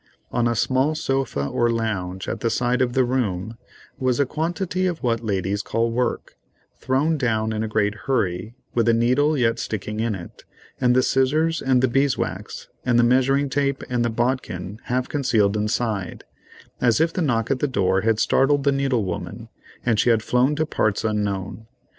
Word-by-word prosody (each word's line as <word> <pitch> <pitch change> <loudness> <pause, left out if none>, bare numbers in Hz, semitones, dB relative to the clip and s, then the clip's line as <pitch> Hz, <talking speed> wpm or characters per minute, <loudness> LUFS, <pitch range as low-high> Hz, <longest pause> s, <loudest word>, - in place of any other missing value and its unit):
On 120 -1 +1
a 120 - 0
small 130 +7 +1
sofa 135 - -1
or 120 +10 +1
lounge 100 -5 -2
at - - -3
the 115 - 0
side 125 +2 0
of 125 -1 +1
the 130 - +3
room 115 -5 -1 0.4
was 130 -1 +1
a 140 - +4
quantity 175 +5 -2
of 170 -5 -4
what 115 -2 0
ladies 100 -1 -1
call 115 +3 -1
"work," 125 +1 -2 0.5
thrown 145 +5 +1
down 110 -3 0
in 110 - -2
a 110 - -1
great 105 -1 +1
hurry, 110 -3 -1 0.2
with 115 -1 +1
the 115 - +4
needle 135 +6 +2
yet 115 -2 +1
sticking 105 0 -4
in 115 -2 0
it, 85 -2 -11 0.4
and 125 -1 +4
the 130 - +4
scissors, 155 +6 +1
and 130 -1 +2
the - - +5
beeswax, 135 +2 -1 0.2
and 125 -2 +2
the 120 - +5
measuring 130 +3 +3
tape, 140 0 -1
and 120 -1 +1
the 120 - +1
bodkin 110 -5 -2
half 125 +1 -1
concealed 110 -8 +1
inside, 105 -2 -2 0.6
as 115 -3 +3
if 165 +1 +2
the 180 - -1
knock 120 -6 0
at 135 - +1
the 145 - +1
door 95 -6 +1
had 110 0 +1
startled 140 +3 +3
the 140 - +3
needle 135 -5 0
woman, 90 - -6 0.4
and 115 -3 +2
she 120 - +3
had 115 -2 +3
flown 125 +5 +2
to 155 +1 0
parts 110 -8 0
unknown. 105 0 -2
120 Hz, 185 wpm, -23 LUFS, 110-135 Hz, 0.6 s, the